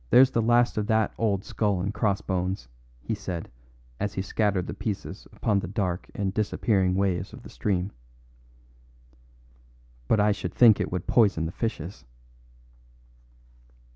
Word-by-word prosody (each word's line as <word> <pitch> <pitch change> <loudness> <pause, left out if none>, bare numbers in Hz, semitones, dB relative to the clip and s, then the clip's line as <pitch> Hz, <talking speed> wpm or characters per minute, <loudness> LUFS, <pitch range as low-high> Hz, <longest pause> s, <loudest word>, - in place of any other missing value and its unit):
"There's 130 +1 +7
the 115 - +1
last 120 0 +3
of 105 - -2
that 110 -2 +2
old 100 -4 +1
skull 105 -4 0
and 100 +3 -2
crossbones," 95 - -1 0.4
he - - -2
said 95 -5 -5 0.5
as 105 -1 -2
he 95 - -1
scattered 100 -3 0
the - - -5
pieces 100 -2 -5
upon 105 -4 +1
the 95 - -4
dark 90 -2 -2
and 95 -2 -1
disappearing 100 -3 +1
waves 95 -2 0
of - - -11
the - - -11
stream; 95 -1 -1 2.2
"but 110 - +3
I 105 +1 +4
should 100 - -4
think 115 -4 +7
it - - -2
would 90 -1 -3
poison 100 -8 +3
the 80 - -3
fishes." 100 -4 -4
100 Hz, 145 wpm, -26 LUFS, 95-110 Hz, 2.2 s, There's